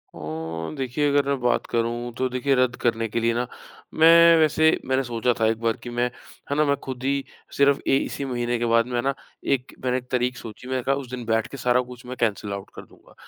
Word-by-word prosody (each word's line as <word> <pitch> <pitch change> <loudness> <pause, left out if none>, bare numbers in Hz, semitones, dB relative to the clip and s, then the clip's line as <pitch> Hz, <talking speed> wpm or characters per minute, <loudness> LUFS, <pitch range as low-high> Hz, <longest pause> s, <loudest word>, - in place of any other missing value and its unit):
ओ 80 +1 -5
देखिए, 135 +2 0
अगर 140 0 +2
मैं 140 -2 0
बात 125 - +1
करूँ, 120 +1 -1
तो 130 - +1
देखिए, 130 +2 +1
रद्द 125 -1 +2
करने 115 -1 +1
के 115 - -1
लिए 115 0 +1
ना, 120 +1 -1 0.5
मैं 165 +1 +7
वैसे 155 +1 +4
मैंने 130 +1 +1
सोचा 120 0 0
था 110 - +3
एक 110 0 0
बार 115 -1 0
कि 120 - -6
मैं 120 0 0 0.5
है - - +1
ना, 150 - +4
मैं 140 - +2
खुद 130 -1 -6
ही 140 0 0 0.3
सिर्फ़ 140 0 +4
ए, - - +4
इसी 140 - -3
महीने 120 -2 -1
के 120 - 0
बाद 115 0 +4
में 120 -1 -1
ना, 135 +2 0 0.3
एक 135 -1 -1
मैंने 125 0 +1
तारीख 125 0 -1
सोची। 115 +3 -10
मैंने 130 -1 -2
कहा, 135 +2 +2
उस 135 -3 -6
दिन 125 -2 -5
बैठके 115 +4 -1
सारा 125 0 +2
कुछ 125 0 -11
मैं 125 +1 -6
कैंसल 105 -3 -1
आउट 100 0 -7
कर - - -7
दूँगा। - - -21
125 Hz, 230 wpm, -24 LUFS, 115-135 Hz, 0.5 s, मैं